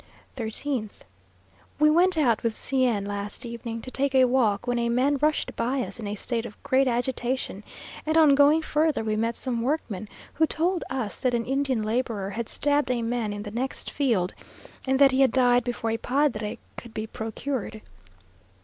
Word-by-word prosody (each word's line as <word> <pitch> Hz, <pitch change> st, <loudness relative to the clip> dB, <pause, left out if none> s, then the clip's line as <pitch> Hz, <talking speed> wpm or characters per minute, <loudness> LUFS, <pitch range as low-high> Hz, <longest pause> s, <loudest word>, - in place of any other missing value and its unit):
13th. 230 Hz, -1 st, -3 dB, 0.7 s
We 305 Hz, +1 st, +5 dB
went 355 Hz, +2 st, +4 dB
out 240 Hz, -8 st, +3 dB
with 230 Hz, -2 st, -1 dB
C 260 Hz, -1 st, +1 dB
n 205 Hz, -4 st, 0 dB
last 205 Hz, +4 st, -5 dB
evening, 230 Hz, -1 st, -6 dB
to 255 Hz, -, -7 dB
take 275 Hz, 0 st, 0 dB
a 260 Hz, -1 st, +7 dB
walk; 245 Hz, -4 st, +2 dB
when 245 Hz, -1 st, 0 dB
a 235 Hz, 0 st, 0 dB
man 265 Hz, +4 st, +2 dB
rushed 305 Hz, 0 st, +1 dB
by 255 Hz, +2 st, 0 dB
us 240 Hz, -, -5 dB
in 215 Hz, -, -5 dB
a 205 Hz, -, -3 dB
state 230 Hz, +2 st, -2 dB
of 225 Hz, -3 st, -9 dB
great 265 Hz, 0 st, +3 dB
agitation, 245 Hz, -3 st, -2 dB, 0.4 s
and 315 Hz, +1 st, +1 dB
on 310 Hz, -3 st, +7 dB
going 290 Hz, +3 st, +5 dB
further 305 Hz, -5 st, +1 dB
we 215 Hz, -1 st, -1 dB
met 230 Hz, +2 st, 0 dB
some 245 Hz, -3 st, -2 dB
workmen, 230 Hz, -, -2 dB, 0.2 s
who 320 Hz, +1 st, +2 dB
told 340 Hz, +2 st, 0 dB
us 255 Hz, -5 st, -3 dB
that 250 Hz, -2 st, +1 dB
an 230 Hz, -1 st, -1 dB
Indian 270 Hz, -3 st, 0 dB
labourer 215 Hz, -3 st, -2 dB
had 230 Hz, +2 st, -4 dB
stabbed 290 Hz, -1 st, +1 dB
a 245 Hz, -2 st, 0 dB
man 230 Hz, -2 st, -1 dB
in 205 Hz, 0 st, -5 dB
the 205 Hz, -, -7 dB
next 255 Hz, +4 st, -3 dB
field, 230 Hz, -11 st, +1 dB, 0.5 s
and 265 Hz, 0 st, +3 dB
that 275 Hz, -1 st, +6 dB
he 260 Hz, +1 st, +2 dB
had 265 Hz, -, +5 dB
died 245 Hz, -1 st, +4 dB
before 235 Hz, -2 st, -2 dB
a 225 Hz, -, 0 dB
padre 240 Hz, -4 st, 0 dB, 0.2 s
could 235 Hz, -2 st, -10 dB
be 215 Hz, -, -2 dB
procured. 220 Hz, +1 st, -4 dB
245 Hz, 190 wpm, -26 LUFS, 225-275 Hz, 0.7 s, a